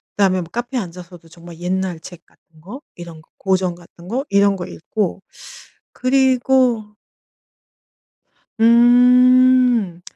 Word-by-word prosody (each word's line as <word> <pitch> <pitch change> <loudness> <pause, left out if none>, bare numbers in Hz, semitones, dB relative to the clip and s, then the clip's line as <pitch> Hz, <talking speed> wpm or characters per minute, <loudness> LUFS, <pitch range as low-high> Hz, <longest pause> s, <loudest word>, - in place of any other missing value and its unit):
그다음에 190 -2 +1
뭐 170 - -10
카페에 240 +3 -4
앉아서도 175 -2 -12
정말 170 0 -14
옛날 180 -1 -3
책 175 +1 -14
같은 160 -1 -28
거 230 - -11
이런 170 -2 -11
거 - - -29
고전 185 -2 -1
같은 170 0 -18
거 255 +7 -3
이런 200 0 +2
거 180 -2 -7
읽고. 190 +3 -5 0.7
그리고 255 -4 0 1.6
음 245 -3 +4
200 Hz, 220 characters per minute, -18 LUFS, 175-245 Hz, 1.6 s, 음